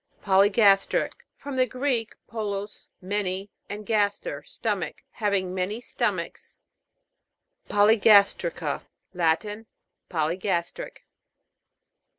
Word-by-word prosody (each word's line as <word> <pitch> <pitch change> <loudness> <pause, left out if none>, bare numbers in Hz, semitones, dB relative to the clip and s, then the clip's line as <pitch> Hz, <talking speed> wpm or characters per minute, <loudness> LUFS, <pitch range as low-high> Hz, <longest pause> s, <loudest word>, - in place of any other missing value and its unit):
POLYGAS'TRIC. 200 +1 +4 0.3
From 280 -2 -6
the 255 0 +3
Greek, 250 -3 -1
polus, 205 -2 -5 0.2
many, 195 0 -2 0.2
and 210 +1 -6
gaster, 210 - 0
stomach. - - -3
Having 200 -4 -1
many 190 +4 -2
stomachs. 245 - -3 1.1
POLYGAS'TRICA. 200 -7 +4 0.3
Latin. 200 +6 0 0.4
Polygas 170 +2 0
tric. - - -9
205 Hz, 80 wpm, -26 LUFS, 185-220 Hz, 1.1 s, POLYGAS'TRIC